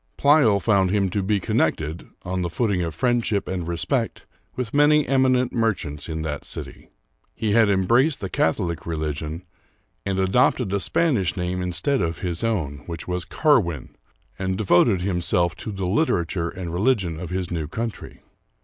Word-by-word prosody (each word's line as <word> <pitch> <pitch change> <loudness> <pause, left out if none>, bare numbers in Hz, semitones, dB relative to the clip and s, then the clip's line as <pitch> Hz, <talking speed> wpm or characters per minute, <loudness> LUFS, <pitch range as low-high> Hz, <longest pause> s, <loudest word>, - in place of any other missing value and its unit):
Pleyel 140 -8 +5
found 100 -3 +2
him 100 -1 +1
to 100 - 0
be 100 +2 +1
connected, 80 -2 -1 0.2
on 90 +1 -2
the 85 - -1
footing 95 +1 0
of 80 -2 -3
friendship 115 -1 0
and 90 -3 -3
respect, 85 -1 -2 0.3
with 125 -4 -4
many 145 0 +4
eminent 130 -2 +2
merchants 95 - -1
in 80 0 -3
that 75 -2 -4
city. - - -7 0.5
He 110 -2 -1
had 110 -1 +4
embraced 120 - +3
the 100 - -4
Catholic 85 0 -1
religion, 80 +1 -3 0.6
and 95 -1 -2
adopted 100 +2 +2
a 100 - +1
Spanish 110 - +1
name 90 0 -2
instead 90 +10 0
of 85 0 -2
his 90 +1 -2
own, 85 -11 -1
which 85 -1 -6
was 90 -1 -3
Carw^in, 105 - +1 0.5
and 95 -1 -1
devoted 95 -1 +3
him 90 -2 -1
self 85 0 +1
to 110 - -6
the 95 -2 -4
literature 90 - 0
and 90 -2 -6
religion 95 -5 +1
of 90 - -6
his 90 -1 -3
new 80 -3 -2
country. 115 +6 -6
95 Hz, 165 wpm, -23 LUFS, 85-115 Hz, 0.6 s, Pleyel